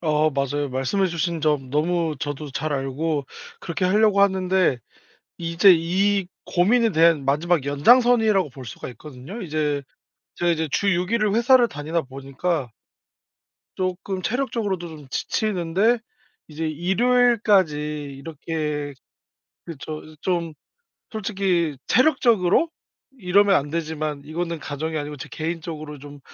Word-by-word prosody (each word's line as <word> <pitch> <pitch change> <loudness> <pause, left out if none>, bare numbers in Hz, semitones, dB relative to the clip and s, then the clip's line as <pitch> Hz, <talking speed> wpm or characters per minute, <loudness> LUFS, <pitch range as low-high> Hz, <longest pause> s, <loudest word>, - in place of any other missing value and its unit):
아 155 -1 +2
맞아요. 140 +1 -1
말씀해 135 +10 0
주신 170 -1 -2
점 150 -4 0
너무 160 +2 0
저도 145 0 -4
잘 155 +2 -2
알고 140 +2 -2 0.3
그렇게 175 +1 -3
하려고 205 +2 +3
하는데 190 -6 +2 0.6
이제 170 +3 +5
이 190 +4 +1 0.2
고민에 225 +6 +3
대한 160 -4 +4
마지막 155 +2 +1
연장선이라고 220 - +4
볼 130 0 -10
수가 115 - -8
있거든요. 150 - -9
이제 150 -4 -1 0.5
제가 175 0 0
이제 160 -2 0
주 200 - +1
6 180 +1 -1
일을 215 -3 +2
회사를 240 +2 +5
다니다 155 +2 -3
보니까 135 +2 -3 1.1
쪼끔 185 +1 -3
체력적으로도 215 -8 -2
좀 150 -4 -12
지치는데 205 - 0 0.5
이제 160 +1 -4
일요일까지 205 0 +3 0.4
이렇게 150 -1 -4 0.7
그쵸. 155 -1 -7 0.2
좀 170 -3 -1 0.6
솔직히 190 -8 -1
체력적으로 250 - +3 0.5
이러면 200 +1 +4
안 145 -3 0
되지만 155 -2 -3
이거는 170 +1 -3
가정이 155 +3 -4
아니고 150 0 -5
제 - - -8
개인적으로 155 -2 -5
좀 145 0 -11
165 Hz, 285 characters per minute, -23 LUFS, 150-195 Hz, 1.1 s, 이제